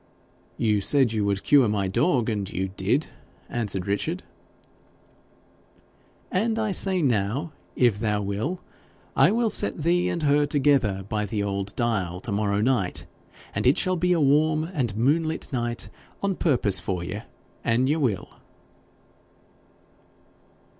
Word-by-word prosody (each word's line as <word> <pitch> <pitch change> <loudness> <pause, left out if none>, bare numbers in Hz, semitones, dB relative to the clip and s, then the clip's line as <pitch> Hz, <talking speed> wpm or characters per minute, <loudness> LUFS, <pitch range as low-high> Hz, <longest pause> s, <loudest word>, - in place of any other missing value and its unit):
'You 105 -3 +1
said 130 +1 +3
you 110 -2 0
would 100 -1 -1
cure 140 -5 +5
my 100 -2 0
dog, 120 - +1
and 105 -4 -2
you 95 +1 -2
did,' 95 - 0 0.4
answered 105 -6 -2
Richard. 100 -2 -2 2.1
'And 220 +4 0
I 220 -2 0
say 185 -2 +2
now, 125 - 0 0.2
if 120 -5 +2
thou 105 -2 0
will, 110 - -3 0.5
I - - +5
will 225 0 +1
set 155 - 0
thee 175 +2 +2
and 170 - -2
her 145 0 +3
together 135 -10 +1
by 105 -1 -2
the 105 0 -2
old 100 0 -3
dial 100 -7 -1
to 115 - -5
morrow 100 0 0
night, 110 -6 0 0.5
and - - 0
it 135 - +4
shall 185 0 +1
be 180 +1 +1
a 175 - +3
warm 155 +2 +3
and 135 - -3
moonlit 155 +6 0
night 120 -1 -2 0.3
on 200 -1 +1
purpose 125 - +2
for 90 -3 -3
ye, 85 - -5 0.4
an 115 +3 +2
ye 145 +3 +2
will.' 120 - -1
120 Hz, 140 wpm, -25 LUFS, 100-155 Hz, 2.1 s, cure